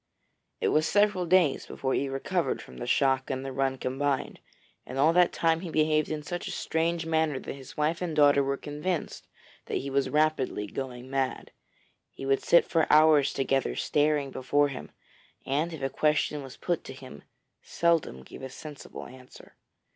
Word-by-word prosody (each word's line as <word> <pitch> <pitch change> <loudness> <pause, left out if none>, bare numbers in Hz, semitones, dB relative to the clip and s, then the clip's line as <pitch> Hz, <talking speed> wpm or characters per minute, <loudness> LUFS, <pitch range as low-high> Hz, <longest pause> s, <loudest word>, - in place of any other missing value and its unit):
It - - +1
was 155 +1 +2
several 205 -3 +2
days 175 -5 +3
before 130 -1 -2
he 140 - 0
recovered 135 0 -1
from 65 - -12
the - - -6
shock 135 -1 +2
and 130 0 -3
the 135 - -4
run 135 0 0
combined, 135 +2 -2 0.4
and 130 - -8
all 155 +4 +4
that 180 0 +4
time 165 -1 +1
he 175 0 -6
behaved 155 -1 +2
in 155 -1 -3
such 175 +3 -5
a - - -4
strange 165 0 -1
manner 160 -3 +1
that - - -6
his 135 -1 -12
wife 155 +3 0
and 170 -3 -2
daughter 145 -2 +5
were 140 0 -1
convinced 150 +5 -4 0.4
that - - -1
he 140 +1 -4
was 140 0 +1
rapidly 150 -8 +1
going 125 +3 -6
mad. 135 -2 -2 0.6
He 135 - -9
would 135 0 +2
sit 170 - +5
for 165 -2 +1
hours 150 -2 +6
together 135 0 0
staring 145 -2 +1
before 145 +3 +1
him, 135 - -7 0.6
and 150 +5 0
if 160 -4 -7
a 135 - 0
question 150 +1 +1
was 135 -2 -10
put 175 -2 -2
to - - -7
him, 130 - -11 0.4
seldom 165 - 0
gave - - -12
a 130 - -6
sensible 150 +2 -9
answer. 130 0 -14
145 Hz, 180 wpm, -28 LUFS, 135-160 Hz, 0.6 s, hours